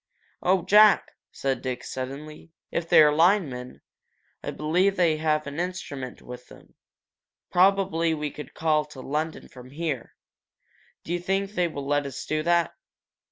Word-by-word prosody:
"Oh, 185 -1 +2
Jack!" 210 0 +6 0.2
said 135 -1 -2
Dick, 125 -1 -4
suddenly. 140 +5 -7 0.2
'If 170 0 -3
they're 150 -1 +7
linemen, 155 -7 +1 0.6
I - - -5
believe 180 +6 +1
they 170 -4 +2
have 155 -1 0
an 140 +2 -6
instrument 160 -8 -5
with 125 0 -10
them. - - -17 0.8
Probably 180 -3 +3
we 150 -1 -3
could 150 -3 -10
call 155 -1 +2
to 150 -3 -13
London 155 +4 -3
from 125 -1 -13
here. 145 -3 -4 0.9
Do 170 - -4
you 175 - 0
think 195 +2 -1
they 180 -4 +1
will 145 -4 -6
let 145 0 0
us 135 0 -7
do 155 0 -1
that?" 170 +1 +2
155 Hz, 150 wpm, -26 LUFS, 140-175 Hz, 0.9 s, they're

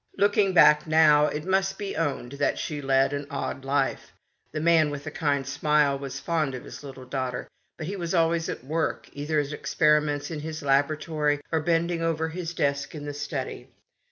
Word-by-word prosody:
Looking 205 -1 +3
back 150 -3 +6
now, 155 -1 +5
it 150 +1 -4
must 190 +1 +1
be 200 -1 -4
owned 145 -6 -2
that 140 - 0
she 150 -2 -4
led 135 0 +2
an 145 0 -4
odd 140 -1 -4
life. 135 0 -1 0.4
The 155 - -3
man 160 -1 +4
with 145 -1 -6
the 155 - -6
kind 145 -4 0
smile 145 0 +2
was 135 0 -6
fond 155 -4 -1
of 125 - -7
his - - -10
little 135 -2 -9
daughter, 130 -1 -3 0.3
but 160 - -5
he 195 +5 -4
was 175 -1 -2
always 165 0 +2
at - - -5
work, 155 +4 -2
either 150 +2 -1
at 145 0 -2
experiments 150 0 +1
in 155 - -4
his 155 0 -6
laboratory 150 +1 +1
or 160 - +2
bending 165 +1 0
over 160 -1 0
his 170 0 -5
desk 140 +1 -1
in 145 -1 -7
the 145 - -4
study. 145 -2 -5
150 Hz, 190 wpm, -26 LUFS, 140-165 Hz, 0.4 s, back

